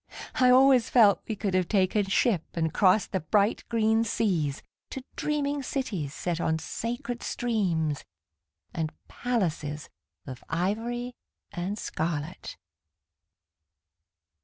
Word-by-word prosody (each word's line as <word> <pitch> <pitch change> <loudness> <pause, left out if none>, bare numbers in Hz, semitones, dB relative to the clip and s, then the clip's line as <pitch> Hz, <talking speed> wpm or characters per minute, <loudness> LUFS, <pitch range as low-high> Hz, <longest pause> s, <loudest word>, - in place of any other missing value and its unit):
I 255 -1 +6
always 255 -1 +6
felt 210 -6 +5
we 220 - -2
could 200 -2 -2
have 185 -2 +2
taken 200 +1 +2
ship 195 -1 +2
And 160 -2 0
crossed 195 +2 +3
the 190 - 0
bright 200 +6 +1
green 225 -1 +2
seas 180 -11 0 0.3
To 265 - -6
dreaming 290 -1 -1
cities 225 - -3
set 170 +2 -3
on 160 0 +1
sacred 240 +7 -4
streams 175 - -1 0.7
And 160 -2 -2 0.2
palaces 160 -11 -2 0.4
Of 130 -3 -8
ivory 225 +8 -2 0.4
and 195 +2 -3
scarlet. 160 -3 -4
200 Hz, 110 wpm, -27 LUFS, 165-240 Hz, 0.7 s, I